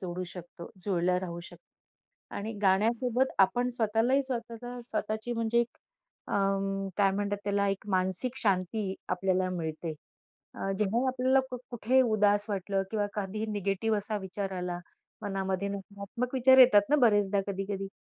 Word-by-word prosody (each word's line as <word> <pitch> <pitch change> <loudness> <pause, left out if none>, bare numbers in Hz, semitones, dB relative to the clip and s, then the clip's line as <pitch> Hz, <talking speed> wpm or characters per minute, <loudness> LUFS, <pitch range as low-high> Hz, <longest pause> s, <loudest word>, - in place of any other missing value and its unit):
जोडू 180 -1 -4
शकतो. 175 -1 -10
जुळल्या 180 -2 +1
राहू 175 -2 -5
शकतो 345 - -12 0.4
आणि 220 +3 -4
गाण्यासोबत 230 +6 +3
आपण 245 +6 +3
स्वतःलाही 230 +5 +2
स्वतःला 245 -1 -5
स्वतःची 220 0 -3
म्हणजे 230 0 +1
एक 235 0 -4 0.5
अं, 195 0 0
काय 200 -2 +4
म्हणतात 205 +1 -1
त्याला? 200 0 +1
एक 195 +1 -3
मानसिक 190 +7 +4
शांती 195 -2 0
आपल्याला 185 0 0
मिळते. 160 -2 -4 0.6
अ, 195 - -3
जेव्हा 220 +5 +1
आपल्याला 260 +1 +2
खूप 250 -1 -6
कुठेही 245 +2 +2
उदास 205 -3 +2
वाटलं 195 0 -1
किंवा 210 -2 0
कधीही 210 +2 -3
निगेटिव्ह 205 +2 0
असा 210 +1 -2
विचार 195 0 -4
आला, 180 -1 -3 0.4
मनामध्ये 195 -1 -2
नकारात्मक 200 +5 -5
विचार 260 +1 +6
येतात 210 -6 +7
ना 300 - +5
बरेचदा 205 -3 +3
कधी-कधी. 195 0 -3
205 Hz, 140 wpm, -29 LUFS, 190-230 Hz, 0.6 s, येतात